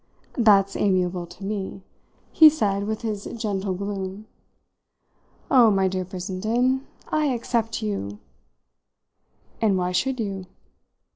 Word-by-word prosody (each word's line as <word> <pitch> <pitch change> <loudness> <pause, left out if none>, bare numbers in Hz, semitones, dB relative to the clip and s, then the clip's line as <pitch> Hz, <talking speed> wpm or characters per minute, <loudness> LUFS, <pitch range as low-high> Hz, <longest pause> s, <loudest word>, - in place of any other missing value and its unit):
"That's 200 -4 +5
amiable 180 -3 0
to 180 +3 -13
me," 195 -2 -4 0.5
he 315 -1 +9
said 205 -9 -1
with 220 +1 -3
his 210 -3 -3
gentle 200 -4 -2
gloom. 200 +1 -5 1.3
"Oh, 250 -5 +7
my 195 -2 +2
dear 185 0 -2
Brissenden, 215 +9 -1 0.2
I 310 -1 +1
except 230 -2 -1
'you.'" 105 - -3 1.4
"And 210 -4 +3
why 180 0 -1
should 260 +7 0
you?" 195 -4 -4
200 Hz, 115 wpm, -24 LUFS, 190-225 Hz, 1.4 s, he